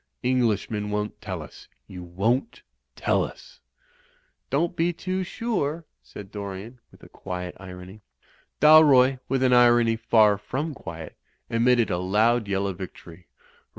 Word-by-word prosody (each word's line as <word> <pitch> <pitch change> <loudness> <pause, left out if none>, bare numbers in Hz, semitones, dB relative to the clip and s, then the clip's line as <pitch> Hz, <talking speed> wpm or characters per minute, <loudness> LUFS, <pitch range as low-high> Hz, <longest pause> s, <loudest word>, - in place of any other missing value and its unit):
Englishmen 110 -4 0
won't 105 0 -4
tell 95 -6 -5
us - - -14
I - - -39 0.2
You 90 -1 -8
won't 110 - -2 0.3
tell - - +1
us - - -10 0.5
!" - - -40
"Don't 165 +5 0
be 170 +1 +1
too 185 +2 -3
sure," 170 -7 -3 0.2
said 100 -2 -12
Dorian, 100 +4 -7
with - - -20
a - - -12
quiet 90 -1 -7
irony. 95 +2 -11 0.6
Dalroy, 140 -4 +6
with 130 0 0
an 125 -1 +3
irony 120 -2 +5
far 110 -3 +3
from 145 +9 -4
quiet, 80 - -9 0.4
emitted 120 0 +2
a 90 - -1
loud 110 +5 +1
yell 100 0 -1
of 95 -2 -4
victory. 90 -2 -10
115 Hz, 145 wpm, -25 LUFS, 95-135 Hz, 0.6 s, Dalroy